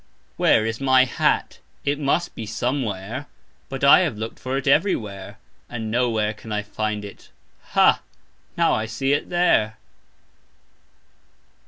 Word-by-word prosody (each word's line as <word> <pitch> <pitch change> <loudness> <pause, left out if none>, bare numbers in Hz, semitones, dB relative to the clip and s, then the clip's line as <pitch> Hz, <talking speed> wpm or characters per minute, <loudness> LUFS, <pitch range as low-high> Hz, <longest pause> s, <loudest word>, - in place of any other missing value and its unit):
"Where" 110 - +3
is 110 +3 -3
my 130 -1 +5
hat? 125 - 0 0.3
It 145 +1 0
must 155 +4 0
be 110 - -7
"somewhere", 120 +1 -3 0.4
but 135 0 -6
I 140 - +8
have 155 - -1
looked 110 +1 -6
for 130 +1 -3
it 135 - -4
"everywhere", 110 - 0 0.3
and 110 -2 -5
"nowhere" 115 -3 +1
can 110 +1 -11
I 105 0 -1
find 105 0 -3
it. 100 - -12 0.4
Ha, - - +5 0.6
now - - +3
I 110 - -1
see 135 +5 0
it 145 - -1
"there". 110 -12 +2
115 Hz, 140 wpm, -23 LUFS, 110-135 Hz, 0.6 s, I